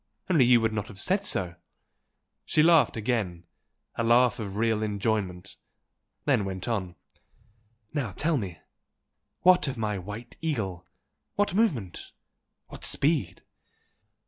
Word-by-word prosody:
Only 150 -8 +5
you 120 -1 +6
would 110 -1 +1
not 110 -2 -3
have 95 - -11
said 190 - 0
so!" 90 - -1 0.9
She 150 - +2
laughed 160 -9 +5
again, 105 -7 -1 0.5
a 115 - -2
laugh 120 +1 +4
of 100 -3 -5
real 110 -1 +1
enjoyment, 100 -4 -2 0.7
then 105 - +3
went 95 0 -5
on 95 -7 -2 1.0
"Now 135 -9 -2
tell 160 - 0
me 95 -8 -5 0.8
what 180 -3 +5
of 135 - -3
my 105 -3 -2
White 105 +6 -9
Eagle? 100 - -3 0.5
what 205 -3 +1
movement? 150 - -1 0.6
what - - -11
speed?" 140 - +1
110 Hz, 125 wpm, -27 LUFS, 95-140 Hz, 1.0 s, you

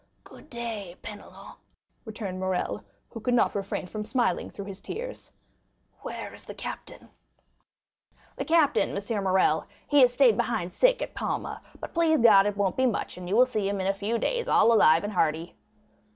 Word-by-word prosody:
"Good - - -16
day, 225 -7 -5
Penelon," 205 -1 -11 0.5
returned 210 -4 -6
Morrel, 185 -1 -2 0.3
who 230 - -7
could 245 +3 0
not - - +3
refrain 195 -1 -3
from 210 +3 -5
smiling 245 +2 0
through 200 - -8
his 195 -1 -9
tears, - - -7 0.7
"where - - -6
is - - -12
the - - -9
captain?" - - -8 1.3
"The - - -4
captain, 315 -9 +2
M. 205 0 -3
Morrel,—he 190 - +1
has 250 -1 +6
stayed 245 -4 +4
behind 180 -7 -1
sick - - +3
at - - -7
Palma; - - -4 0.2
but - - -8
please 325 -2 +3
God, 205 -5 +6
it 205 -1 -2
won't 195 -2 0
be 260 0 +3
much, 230 - -2
and 180 -1 -8
you 200 - +1
will 250 +2 +7
see 215 -6 -2
him 200 -1 -2
in 190 - -2
a 195 - +2
few 205 +4 -2
days 475 - -1
all 230 - +5
alive 165 -6 +5
and 205 +1 -4
hearty." 165 -1 0
210 Hz, 180 wpm, -27 LUFS, 195-245 Hz, 1.3 s, will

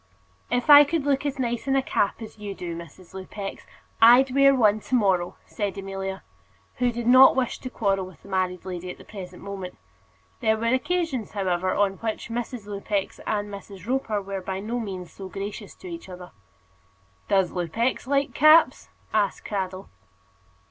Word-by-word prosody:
"If 245 0 0
I 290 -1 +10
could 295 0 -1
look 285 0 +1
as 280 - -3
nice 240 -1 -2
in 270 - +2
a 270 - +2
cap 205 -2 0
as 220 0 -11
you 205 -2 -6
do, 175 -2 -5
Mrs. 170 +2 -12
Lupex, 195 +1 -7 0.3
I'd 250 +3 +7
wear 275 0 +6
one 215 -4 +4
to 255 - -2
morrow," 190 -6 +1
said 205 -3 -4
Amelia, 195 0 -5 0.5
who 250 -1 +2
did 235 0 -5
not 255 +2 +8
wish 255 -3 -1
to 255 - -6
quarrel 195 -6 0
with 185 - -16
the - - -14
married 185 -2 -1
lady 180 -1 -5
at - - -7
the - - -14
present 185 -3 -9
moment. 195 -2 -7 0.6
There 220 0 +2
were 230 +2 0
occasions, 275 - -1
however, 185 -2 0
on 195 -1 +1
which 225 +1 -4
Mrs. 235 -1 -4
Lupex 200 -1 -3
and 205 -1 -1
Miss 200 0 -9 0.2
Roper 225 -5 -1
were 195 0 -5
by 190 +1 -4
no 225 +5 -3
means 190 -5 -6
so 190 -1 -9
gracious 200 +2 -7
to 370 - -12
each 335 - -8
other. 180 -1 -10 1.0
"Does 190 -3 +3
Lupex 225 +9 -1
like 280 +1 +1
caps?" 310 +2 +5 0.2
asked 205 -3 0
Cradell. 190 -2 -4
205 Hz, 175 wpm, -25 LUFS, 190-250 Hz, 1.0 s, I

